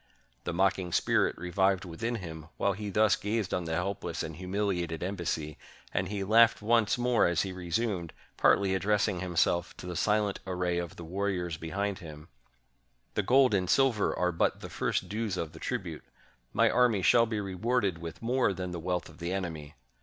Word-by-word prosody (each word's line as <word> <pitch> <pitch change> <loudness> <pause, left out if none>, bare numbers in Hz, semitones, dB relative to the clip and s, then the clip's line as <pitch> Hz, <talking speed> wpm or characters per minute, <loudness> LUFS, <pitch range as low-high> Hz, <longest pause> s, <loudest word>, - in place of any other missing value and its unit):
The - - -1
mocking 95 0 +1
spirit - - +2
revived 95 +2 +1
within 105 +8 -3
him 80 -6 -7
while 100 - +1
he 105 +2 -5
thus 105 0 +4
gazed 105 -1 -2
on 90 - -1
the 80 0 -2
helpless 90 -1 -2
and 80 -1 -6
humiliated 90 -2 -2
embassy; 85 -5 -3 0.3
and 95 +1 0
he 100 -1 -2
laughed 115 +3 +5
once 115 +2 +2
more 125 -4 +3
as 85 -2 +1
he 95 -2 -4
resumed, 90 0 -2 0.2
partly 100 -1 +3
address 105 +2 +2
ing 95 -4 -2
himself 85 -1 0
to - - -9
the 90 -1 -5
silent 105 +2 +1
array 90 -1 0
of 85 -1 -5
the 85 - -9
warriors 90 -1 -2
behind 95 +5 -3
him: 75 -2 -11 0.4
— 65 0 -44
"The - - +1
gold 130 +3 +4
and 90 -2 +1
silver 130 -6 +3
are 90 0 +1
but 85 - 0
the - - -8
first - - -1
dues 105 -3 -2
of 80 -3 -3
the - - -12
tribute - - -4 0.3
— - - -40
my - - +4
army 120 -6 +3
shall 115 +3 +5
be 110 -1 -2
rewarded 100 -1 0
with 85 +5 -8
more 125 -3 +2
than 90 -1 -4
the 85 - -4
wealth 90 0 -2
of - - -16
the 85 +1 -3
enemy. 80 -6 -4
95 Hz, 190 wpm, -30 LUFS, 85-105 Hz, 0.4 s, laughed